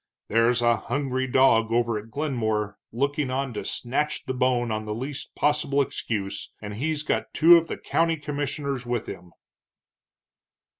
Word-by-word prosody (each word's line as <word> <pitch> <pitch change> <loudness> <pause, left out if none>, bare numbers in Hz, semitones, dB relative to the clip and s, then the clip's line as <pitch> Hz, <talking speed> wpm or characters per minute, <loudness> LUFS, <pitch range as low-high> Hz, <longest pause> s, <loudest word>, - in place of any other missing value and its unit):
There's 115 +2 +3
a 120 -1 +4
hungry 130 +2 -2
dog 120 -3 +4
over 115 -2 +1
at 110 +2 -12
Glenmore 110 -7 -2
looking 140 +3 -1
on 135 0 -2
to - - -4
snatch 140 +5 -2
the 130 - -2
bone 125 -2 +1
on 110 0 -2
the 105 0 -3
least 135 +4 -6
possible 145 -1 +1
excuse, 100 -7 -2
and 105 -1 -7
he's 150 +7 -1
got - - -2
two 170 +2 +8
of 165 -1 +3
the - - -4
county 165 0 +1
commissioners 145 -2 -3
with 120 -2 -2
him." 90 0 -9
125 Hz, 155 wpm, -25 LUFS, 115-145 Hz, -, two